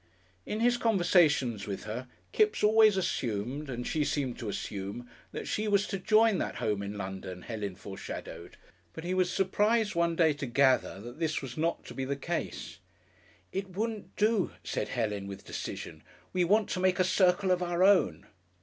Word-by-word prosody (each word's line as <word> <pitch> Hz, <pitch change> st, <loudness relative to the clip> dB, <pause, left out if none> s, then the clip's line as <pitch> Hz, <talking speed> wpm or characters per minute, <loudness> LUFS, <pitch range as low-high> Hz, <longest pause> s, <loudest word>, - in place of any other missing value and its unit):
In 215 Hz, -, -2 dB
his 240 Hz, +1 st, +4 dB
conversations 170 Hz, -, +3 dB
with 100 Hz, -2 st, -4 dB
her 115 Hz, +4 st, -5 dB, 0.2 s
Kipps 430 Hz, -, +2 dB
always 215 Hz, -1 st, +6 dB
assumed, 130 Hz, -, -2 dB
and 125 Hz, -1 st, -4 dB
she 155 Hz, -2 st, 0 dB
seemed 140 Hz, -4 st, -2 dB
to 110 Hz, -, -4 dB
assume, 100 Hz, +4 st, -5 dB, 0.2 s
that -, -, -6 dB
she 215 Hz, +1 st, -1 dB
was 205 Hz, -1 st, +3 dB
to 195 Hz, -, -3 dB
join 215 Hz, 0 st, +4 dB
that -, -, -2 dB
home 105 Hz, -2 st, -1 dB
in 100 Hz, +1 st, -5 dB
London 95 Hz, -2 st, -6 dB
Helen 105 Hz, -5 st, -4 dB
foreshadowed, 95 Hz, +1 st, -8 dB, 0.4 s
but 160 Hz, -, -8 dB
he 180 Hz, +1 st, -2 dB
was 185 Hz, -1 st, +2 dB
surprised 210 Hz, +3 st, +2 dB
one 170 Hz, -1 st, +1 dB
day 160 Hz, -2 st, +4 dB
to 140 Hz, -1 st, -5 dB
gather 130 Hz, -5 st, +3 dB
that 120 Hz, +6 st, -10 dB
this 155 Hz, -3 st, -1 dB
was 130 Hz, -2 st, -6 dB
not 165 Hz, +2 st, -1 dB
to -, -, -9 dB
be 135 Hz, -, -3 dB
the 140 Hz, +2 st, -1 dB
case. 165 Hz, +5 st, -4 dB, 0.7 s
"It 190 Hz, -1 st, -5 dB
wouldn't 215 Hz, -4 st, -3 dB
do," 215 Hz, -2 st, +2 dB
said -, -, -2 dB
Helen, 105 Hz, -5 st, -2 dB
with 100 Hz, 0 st, -8 dB
decision. -, -, -6 dB, 0.3 s
"We 180 Hz, -1 st, +2 dB
want 210 Hz, +4 st, +3 dB
to -, -, -2 dB
make 185 Hz, -1 st, +2 dB
a 185 Hz, -, +4 dB
circle 185 Hz, +1 st, +3 dB
of 180 Hz, 0 st, +2 dB
our 175 Hz, 0 st, +1 dB
own." 180 Hz, -, +4 dB
170 Hz, 180 wpm, -30 LUFS, 120-195 Hz, 0.7 s, always